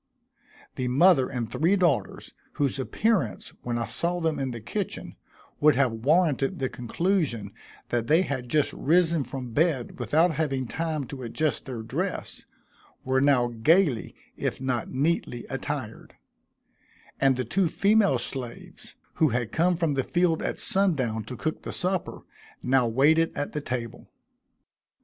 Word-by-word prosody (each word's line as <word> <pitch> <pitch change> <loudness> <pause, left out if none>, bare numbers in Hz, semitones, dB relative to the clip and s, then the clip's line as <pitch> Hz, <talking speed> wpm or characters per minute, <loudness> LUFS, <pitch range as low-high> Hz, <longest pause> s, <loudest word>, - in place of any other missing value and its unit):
The 130 - -1
mother 135 +1 +4
and 120 -3 -3
three 160 - +2
daughters, 175 -8 0 0.2
whose 140 -1 -1
appearance, 150 - -1
when 120 -1 -2
I 115 - -1
saw 170 +10 -1
them 160 -2 0
in 135 -1 -1
the 120 -2 -5
kitchen, 110 - -5 0.4
would 150 -2 +5
have 130 -2 +3
warranted 140 +3 +1
the 130 -2 -1
conclusion 145 - -1 0.4
that 120 -1 -1
they 165 +4 +4
had 130 -7 -4
just 150 +2 +2
risen 165 0 +2
from 130 -2 -6
bed 145 -6 0
without 155 +9 +3
having 140 -4 -1
time 160 +3 -2
to 130 +1 -8
adjust 145 +6 -1
their 120 -4 -5
dress, 110 - -4 0.6
were 130 0 +2
now 135 -4 +3
gaily, 135 +3 +2 0.2
if - - -3
not 125 -3 -2
neatly 135 -4 -1
attired; - - -5 1.0
and 135 -1 +4
the 125 0 -2
two 180 - +1
female 200 - +3
slaves, 120 0 -6 0.2
who 155 - +4
had 120 -2 -2
come 175 +2 +2
from 165 -4 +1
the 135 -1 0
field 175 0 +1
at - - -2
sundown 135 - 0
to 125 +2 -7
cook 155 - -3
the - - -6
supper, 185 0 -2 0.4
now 125 -1 +3
waited 150 +8 +3
at 145 - -2
the 150 - -3
table. 120 -4 -5
135 Hz, 150 wpm, -26 LUFS, 125-165 Hz, 1.0 s, would